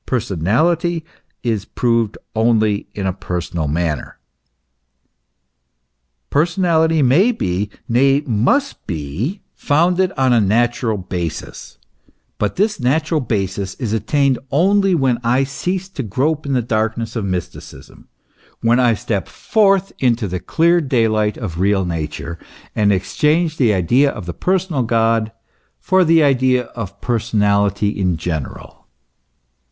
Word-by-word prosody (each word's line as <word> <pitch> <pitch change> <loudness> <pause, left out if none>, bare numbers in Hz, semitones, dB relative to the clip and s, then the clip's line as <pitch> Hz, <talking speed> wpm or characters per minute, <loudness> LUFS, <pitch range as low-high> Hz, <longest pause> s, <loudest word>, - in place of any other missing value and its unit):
Personality 150 - 0 0.4
is 110 -5 -1
proved 115 -2 0 0.2
only 110 -2 +1
in 100 - -3
a 95 - 0
personal 85 -4 -4
manner. 80 -1 -2 2.1
Personality 160 -1 +2
may 165 - +4
be, 95 - -2 0.2
nay, 135 +4 +3
must 140 - 0
be, 90 - -4
founded 175 +5 +1
on 130 -2 +3
a 115 - +4
natural 115 +2 +1
basis; 90 -3 -6 0.6
but 105 - -1
this 210 +2 0
natural 155 +5 +1
basis 95 -4 -2
is 115 -5 -3
attained 130 +4 +1
only 190 +6 +3
when 130 -6 +1
I 125 +3 +2
cease 180 +8 -3
to 170 -7 -5
grope 140 +7 -1
in 140 - -1
the 125 -2 +1
darkness 115 +1 -2
of 115 - -2
mysticism, 90 -2 -7 0.5
when 120 +2 +3
I 120 -3 +3
step 100 -1 -3
forth 195 -3 +1
into 120 -4 +1
the 90 0 -3
clear 170 - +2
daylight 110 -6 +1
of 90 -8 -5
real 95 0 +2
Nature, 85 0 -5 0.4
and 105 -2 +3
exchange 155 - +1
the 120 -5 +3
idea 120 - +3
of 105 -8 -7
the 85 - -5
personal 180 - 0
God 115 -1 +1 0.5
for 185 0 +3
the 165 -1 +4
idea 130 -2 +3
of 105 -5 -7
personality 105 -4 +1
in 90 -5 -1
general. 80 -3 -6
120 Hz, 125 wpm, -18 LUFS, 100-150 Hz, 2.1 s, may